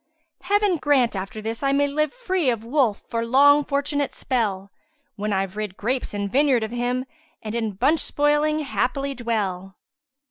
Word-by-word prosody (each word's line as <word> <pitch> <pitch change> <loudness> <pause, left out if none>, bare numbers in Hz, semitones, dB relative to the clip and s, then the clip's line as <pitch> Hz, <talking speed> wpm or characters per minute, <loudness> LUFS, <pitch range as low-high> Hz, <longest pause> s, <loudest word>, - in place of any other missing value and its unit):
Heaven 405 -1 +2
grant 275 -7 +2
after 195 +3 -5
this 225 +1 -4
I 275 -1 +1
may 285 +1 +3
live 305 +2 0
* - - -22
Free 365 -7 +1
of 230 -3 -1
Wolf 240 -3 +1
for 230 0 -2
long 285 +5 +5
fortunate 285 0 -1
spell 200 -7 -2 0.4
When 210 +1 -3
I've 195 -1 -1
rid 210 -3 -5
grapes 250 +4 -2
and 200 0 -2
vineyard 260 0 +2
of 220 - -4
him, 245 +1 -1 0.2
* 320 0 -35
And 215 -1 -5
in 225 -3 -2
bunch 275 +11 +2
spoiling 295 +1 +1
happily 275 0 -1
dwell." 200 -6 -3
250 Hz, 175 wpm, -23 LUFS, 215-290 Hz, 0.4 s, long